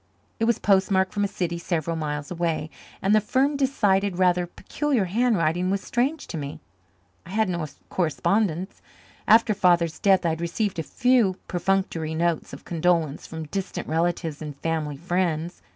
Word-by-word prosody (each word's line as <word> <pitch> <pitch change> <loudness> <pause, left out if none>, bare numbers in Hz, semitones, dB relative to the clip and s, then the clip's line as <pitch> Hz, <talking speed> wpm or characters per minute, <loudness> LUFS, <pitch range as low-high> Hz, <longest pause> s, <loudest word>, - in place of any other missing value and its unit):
It 225 - +2
was 235 -1 +2
postmarked 190 -1 +2
from 205 - 0
a - - +2
city 170 -3 -3
several 170 -2 -2
miles 150 -1 -4
away, 165 -3 -2 0.3
and 195 - +3
the 215 - +5
firm, 270 +7 +1
decided, 205 -9 +1
rather 180 -1 +3
peculiar 265 - -1
handwriting 185 -5 +1
was 195 0 0
strange 270 +6 -1
to - - -6
me. 140 0 -6 0.6
I 170 - -14
had 220 +3 +1
no 170 -4 -2 0.2
correspondents. 185 +2 0 0.5
After 225 0 +6
Father's 175 -4 +2
death 190 -3 +3
I - - +3
had 160 +1 -2
received 175 +2 -1
a - - +1
few 235 - +2
perfunctory 175 -3 -1
notes 170 -1 0
of 140 - -10
condolence 165 -3 0
from 160 -1 -6
distant 195 +1 -4
relatives 165 -1 -1
and 150 -2 -6
family 155 -2 -2
friends. 175 0 -1
180 Hz, 160 wpm, -25 LUFS, 165-200 Hz, 0.6 s, After